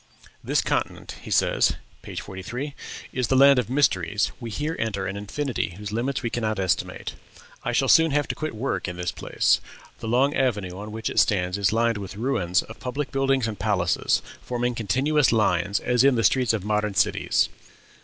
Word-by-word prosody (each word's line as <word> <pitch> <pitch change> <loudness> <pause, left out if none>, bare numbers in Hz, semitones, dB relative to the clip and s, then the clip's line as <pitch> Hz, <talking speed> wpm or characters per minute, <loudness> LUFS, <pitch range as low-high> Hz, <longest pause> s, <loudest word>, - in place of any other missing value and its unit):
"This - - +1
continent," - - -2
he - - -10
says - - +3 0.3
(page - - -6
43), 120 +9 -6 0.4
"is 125 -2 0
the 130 - +2
land 140 0 +7
of 125 - -2
mysteries; 105 - +1
we 120 -2 -6
here 150 +8 -3
enter 100 -4 -2
an 95 - -3
infinity 105 - -3
whose 105 0 -6
limits 125 +5 -2
we 115 - -2
cannot 110 -2 -1
estimate.... 95 -2 -1 0.5
I - - -1
shall - - +2
soon 160 0 +6
have 145 0 +1
to - - 0
quit 155 -5 -4
work 125 0 -2
in 90 -1 -5
this 90 -1 -2
place. - - +1 0.4
The - - -6
long 130 +5 +3
avenue 105 -10 0
on 105 +2 -7
which 110 +1 -3
it - - +2
stands 90 -2 +2
is 100 -1 +1
lined 115 -1 +1
with 100 0 -7
ruins 95 -7 +1
of 110 - -12
public 130 +1 -4
buildings 135 -3 +1
and 105 -4 -5
palaces, 90 -4 +1 0.2
forming 120 0 -2
continuous 130 +6 +2
lines, 100 -3 +2
as 125 0 +2
in 135 -1 +5
the 115 - +1
streets 125 -1 +3
of 105 -4 -2
modern 105 -1 0
cities. - - +2
115 Hz, 190 wpm, -25 LUFS, 100-130 Hz, 0.5 s, land